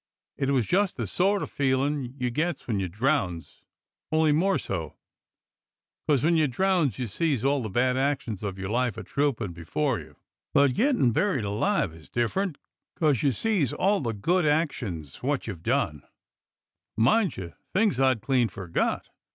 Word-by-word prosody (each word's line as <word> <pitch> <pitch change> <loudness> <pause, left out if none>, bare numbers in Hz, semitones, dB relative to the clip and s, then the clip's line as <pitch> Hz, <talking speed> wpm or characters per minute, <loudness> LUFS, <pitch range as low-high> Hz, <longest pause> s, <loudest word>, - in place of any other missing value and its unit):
It 135 - -1
was 130 -5 +2
just 195 - +1
the - - -2
sort 195 +2 +1
o' - - -1
feelin' 135 -1 -1
you 125 -2 -1
gets 155 +4 -2
when 110 -5 0
you 95 - -1
drowns, 100 - -1 0.5
only 155 -1 +3
more 185 +6 +3
so. 80 -6 -4 1.1
'Cos 140 -5 +3
when 170 +2 +3
you 155 -2 +3
drowns 165 - +1
you 125 - -2
sees 135 - -1
all 140 0 +2
the 110 - -4
bad 125 +5 +1
actions 130 -7 -1
of 100 -3 -4
your 95 0 -4
life 120 0 0
a 110 - -5
troopin' 120 -6 -1
before 110 - -1
you, - - -13 0.4
but 140 -2 +5
gettin' 245 - +3
buried 135 - +1
alive 105 - 0
is 80 0 -15
different, 150 - -1 0.4
'cos 150 -8 +2
you 140 - +3
sees 185 - 0
all 200 +2 +2
the 115 -5 -2
good 175 - +1
actions 125 - -1
wot 140 +1 -1
you've 100 -7 -6
done. 75 -3 0 1.0
Mind 165 - +3
you, 85 -3 -6 0.2
things 200 - +2
I'd 130 -4 +3
clean 125 -2 +2
forgot. 95 -4 -2
130 Hz, 165 wpm, -27 LUFS, 110-155 Hz, 1.1 s, but